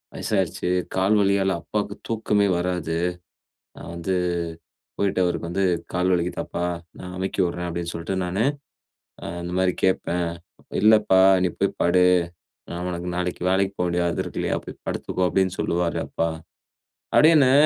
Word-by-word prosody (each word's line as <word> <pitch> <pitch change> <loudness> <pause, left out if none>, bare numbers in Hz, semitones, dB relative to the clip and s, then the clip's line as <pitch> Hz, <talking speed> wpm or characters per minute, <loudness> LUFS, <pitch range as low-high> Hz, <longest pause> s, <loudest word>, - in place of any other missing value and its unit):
வயசாயிடுச்சு. 95 -3 -1 0.3
கால் 95 +3 +3
வலியால 100 -1 +2
அப்பாவுக்கு 105 +1 -3
தூக்கமே 105 -2 +2
வராது. 90 -2 -1 0.8
நா - - -10
வந்து 85 +2 -1 0.8
போயிட்டு 100 -2 +1
அவருக்கு 85 -1 -2
வந்து 95 +2 0 0.3
கால் 90 +1 +2
வலிக்குதாப்பா? 85 0 -2 0.3
நா - - -9
அமுக்கி 95 +1 -1
விட்றே 90 0 -2
அப்படின்னு 85 0 -3
சொல்லிட்டு 85 +3 -3
நானு, 95 +5 0 0.8
ஆ - - -5 0.2
அந்த 85 +1 -5
மாரி 95 -1 +2
கேட்பே. 90 -2 +1 0.6
இல்லப்பா, 105 -3 +6 0.2
நீ 90 - +2
போய் - - +1
படு. 90 +1 +4 0.7
நா 85 - -4
உனக்கு 90 0 -4
நாளைக்கு 90 0 -2
வேலைக்கு 95 +1 +1
போக 90 - +2
வேண்டியது 85 0 +1
அது - - -1
இருக்கு - - -4
இல்லையா? - - 0
போய் - - -10
படுத்துக்கோ 90 - -1
அப்படின்னு 95 -1 +1
சொல்லுவாரு 85 0 0
அப்பா. 85 - -1 0.9
அப்டினு 150 -4 +6
90 Hz, 145 wpm, -24 LUFS, 85-100 Hz, 0.9 s, இல்லப்பா